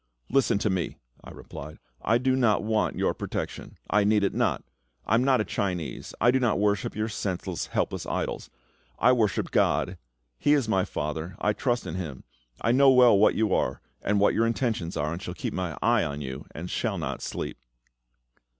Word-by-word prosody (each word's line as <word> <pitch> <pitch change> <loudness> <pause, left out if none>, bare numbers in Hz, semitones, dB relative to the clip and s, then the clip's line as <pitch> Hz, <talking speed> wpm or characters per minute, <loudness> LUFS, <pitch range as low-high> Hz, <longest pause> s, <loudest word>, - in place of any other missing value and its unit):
"Listen 135 -5 +3
to 105 0 0
me," 90 -3 -2 0.3
I - - -10
replied. 75 +2 -9 0.2
"I 115 - +3
do 130 +1 +1
not 120 -5 +2
want 110 0 0
your - - +1
protection; - - -5
I 105 -1 +3
need 105 0 +3
it 100 - +1
not; 110 - 0 0.4
I - - 0
am 115 +3 +4
not 130 -1 +3
a - - -2
Chinese; 90 -5 -3
I 120 - +5
do 130 - +2
not 120 -7 +2
worship 105 0 0
your 110 +1 -1
senseless, 95 -4 -3
helpless - - -2
idols. - - -3 0.5
I 125 - +5
worship 110 -6 +1
GOD; - - +1 0.4
He 145 - +4
is 140 -6 +2
my 95 -3 +2
FATHER; 80 +1 -4
I 105 - +1
trust 120 -1 -1
in 85 - -5
Him. 75 -8 -6 0.4
I 115 - +2
know 135 +2 +6
well 125 -4 +7
what 100 +2 +4
you 110 -3 +1
are, - - 0 0.2
and 100 +1 +1
what 100 - +4
your 115 +1 +2
intentions 110 -7 -1
are, 75 +2 -1
and 85 - -6
shall 90 -2 -6
keep - - -4
my 90 -5 -3
eye - - +4
on 70 0 -3
you, 65 -2 -6
and 85 +3 -7
shall - - -2
not - - -4
sleep." - - -5
105 Hz, 195 wpm, -27 LUFS, 90-120 Hz, 0.5 s, well